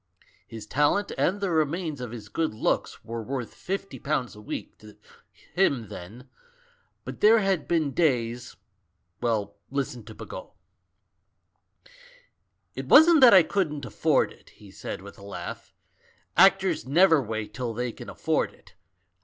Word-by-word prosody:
His 110 -1 -9
talent 150 +8 +1
and 195 +4 +1
the 195 -3 -1
remains 160 -2 -1
of 125 - -5
his 110 -3 -9
good 130 +3 -2
looks 110 - -2
were 115 0 -5
worth 125 +1 -5
fifty 195 +1 -5
pounds 140 -6 -2
a 105 - -12
week 105 - -7
to 105 -1 -15 0.6
him 135 - +1
then, 110 +9 -10 0.8
but - - -8
there 220 +2 +7
had 195 -5 0
been 160 -4 +1
days 120 -6 0 0.3
— 85 +1 -48
well, 110 -4 -1
listen 130 -4 -3
to 110 -1 -11
Bagot! - - -9 2.2
"It - - -6
wasn't 320 -1 +7
that 240 -5 +9
I 185 - +8
couldn't 155 -7 -2
afford 110 - +1
it," - - -21
he 100 -2 -16
said 95 - -7
with 100 0 -12
a - - -13
laugh; 100 - -8 0.6
"actors - - +4
never 160 +4 +4
wait 110 -3 -5
till 120 0 -3
they 125 +1 -2
can - - -10
afford - - -1
it. - - -22
130 Hz, 150 wpm, -26 LUFS, 110-170 Hz, 2.2 s, that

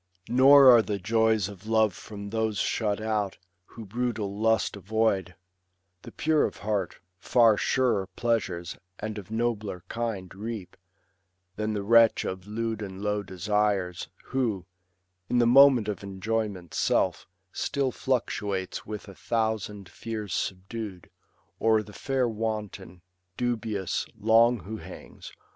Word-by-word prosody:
Nor 135 +1 +8
are 115 - +6
the 105 -2 -3
joys 110 0 +2
of 100 0 -11
love 110 -3 +3
from 100 0 -9
those 110 -2 -1
shut 105 0 0
out 110 -3 -1 0.3
Who 115 +3 -11
brutal 110 -2 -2
lust 110 +1 +1
avoid; 100 -2 0 0.7
the - - -11
pure 155 -1 +2
of - - -5
heart 100 -3 -2 0.2
Far 115 +2 +4
surer 115 -4 +1
pleasures, 95 -8 -1 0.2
and 110 0 -5
of 100 - -12
nobler 110 -5 -2
kind, 110 -6 -4
Reap, 105 -1 -6 0.8
than 110 0 -2
the 100 -1 -2
wretch 115 +1 +5
of 95 +1 -5
lewd 110 +1 -3
and 95 -1 -7
low 105 0 0
desires, 100 -1 -1 0.2
Who, 110 -9 -1 0.6
in 125 - +1
the 120 - +4
moment 130 -2 +6
of 105 - -3
enjoyment's 100 -2 -3
self, - - +1 0.2
Still 135 -2 -1
fluctuates 105 -7 -2
with 105 0 -6
a 100 - -10
thousand 110 -2 -2
fears 105 +1 -6
subdued; 95 0 -5 0.5
O'er 110 -1 +3
the 105 - -13
fair 135 0 0
wanton, 105 -5 -5 0.3
dubious, 110 -6 -2
long 115 +1 +4
who 105 +6 -6
hangs. - - -11
110 Hz, 130 wpm, -27 LUFS, 100-115 Hz, 0.8 s, Nor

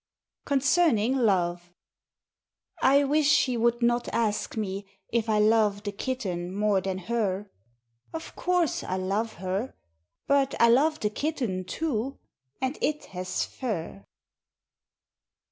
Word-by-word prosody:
Concerning 275 - +3
Love 175 -7 +1 1.1
I 280 +2 +5
wish 295 +1 +2
she 255 -4 +3
would 235 +1 +1
not 240 0 +2
ask 215 -1 -1
me 200 -2 -3 0.2
if 230 -1 0
I 215 - +3
love 210 -1 +3
the 205 - -3
Kitten 195 -6 -3
more 205 -2 +2
than 190 0 -2
her. 205 -1 -2 0.6
Of 325 0 -7
Course 355 -3 +1
I 185 - -2
love 200 +4 -1
her. 190 +7 -3 0.5
But 275 -1 +2
I 235 - +6
love 305 +6 +4
the 210 - 0
Kitten, 235 -10 -2
too; 275 - -2 0.4
and 260 +2 -2
It 300 0 -1
has 185 0 -2
Fur. 170 - -5
225 Hz, 125 wpm, -27 LUFS, 195-270 Hz, 1.1 s, I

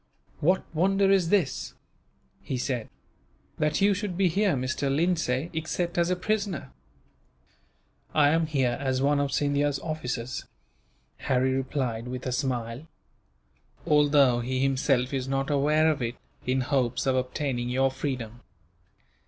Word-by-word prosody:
"What 180 +5 +2
wonder 195 +4 +3
is 185 -4 +3
this," 170 -10 0 0.7
he 130 - -3
said, 125 -3 -2 0.7
"that 150 +2 +1
you 200 +1 +5
should 200 -3 -4
be 190 -2 +3
here, 195 0 +2
Mr. 130 +2 -1
Lindsay, 160 -1 0
except 165 +2 -2
as 170 0 +2
a 180 - +2
prisoner?" 195 - -2 1.4
"I 145 -2 +4
am 160 +1 +2
here 130 -5 0
as 130 -2 0
one 140 +2 +2
of 140 -1 0
Scindia's 145 0 +1
officers," 130 -6 -4 0.7
Harry 130 0 +1
replied, 130 -3 -2
with 125 0 -5
a 130 - -1
smile, 125 +1 -2 1.0
"although 145 -4 +4
he 130 +2 -2
himself 135 -1 +1
is 130 -1 -2
not 135 +2 -1
aware 150 +3 +3
of 145 - -3
it, 120 0 -2 0.3
in 130 +1 +2
hopes 125 -2 0
of 130 -1 +2
obtaining 125 -1 -2
your 135 +1 +2
freedom." 125 -4 -4
140 Hz, 135 wpm, -27 LUFS, 130-160 Hz, 1.4 s, you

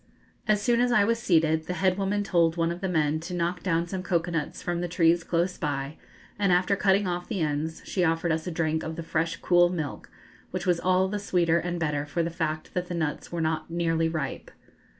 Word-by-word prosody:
] - - -33
As 210 - +3
soon 235 +2 +2
as 245 0 +2
I 215 -4 +5
was 230 +2 +1
seated, 160 -6 +2
the 180 - -2
head 185 -1 +2
woman 200 +1 0
told 170 -4 +2
one 165 0 +1
of 175 - -6
the 190 - -1
men 155 -3 +1
to 175 +3 -6
knock 175 +1 -1
down 170 -2 +1
some 185 +2 -4
cocoa 175 -2 0
nuts 160 -3 -3
from 175 -1 -2
the 175 - -1
trees 170 0 +3
close 175 +2 -1
by, 145 -1 -2 0.4
and 200 -2 +3
after 180 +3 +3
cutting 195 +1 +3
off 175 -1 -3
the 200 -6 -2
ends 155 +1 -2
she 185 - 0
offered 165 0 +1
us 160 +1 -1
a - - -2
drink 160 -1 0
of 160 0 -5
the 165 - -5
fresh 165 +1 -1
cool 175 -1 +5
milk, 160 -6 -4 0.4
which - - -4
was 175 -2 +2
all 185 +1 +2
the 205 +2 -3
sweeter 170 -4 +2
and 175 +1 -3
better 150 -3 -1
for 170 +3 -1
the 165 - -2
fact 155 -2 -3
that 180 0 -2
the 175 - -4
nuts 155 -3 -3
were 170 -1 -2
not 160 0 -1
nearly 165 -1 +1
ripe. 155 -4 -4
170 Hz, 235 wpm, -27 LUFS, 160-180 Hz, 0.4 s, I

